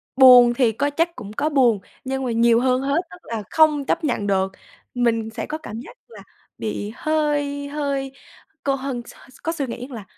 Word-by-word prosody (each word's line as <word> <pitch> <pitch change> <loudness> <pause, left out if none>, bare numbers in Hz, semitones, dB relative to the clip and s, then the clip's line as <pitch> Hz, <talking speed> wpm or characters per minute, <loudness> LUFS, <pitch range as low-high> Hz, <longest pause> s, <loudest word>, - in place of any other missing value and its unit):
buồn 250 -2 +8
thì 240 -2 +2
có, 285 +6 -1
chắc 330 +4 0
cũng 205 0 -9
có 295 +6 0
buồn, 245 -8 +3 0.2
nhưng 265 0 -3
mà 245 - -1
nhiều 230 0 +4
hơn 255 0 +2
hết 280 +5 +1
tức 180 - -11
là 225 -2 -5
không 305 -3 +4
chấp 320 - 0
nhận 235 -8 -1
được. 190 -1 +1 0.4
Mình 230 -2 0
sẽ 220 - -5
có 310 - -4
cảm 230 -8 -8
giác - - -13
là - - -13 0.4
bị 210 -1 -4
hơi 290 -2 -1
hơi 280 -2 -2 0.5
cô 275 -1 +1
hân 265 -2 -4
s - - -12 0.2
s - - -17
có 330 - 0
suy 285 -6 -3
nghĩ 245 +2 -6
rằng - - -17
là 215 - -7
265 Hz, 210 wpm, -22 LUFS, 230-285 Hz, 0.5 s, buồn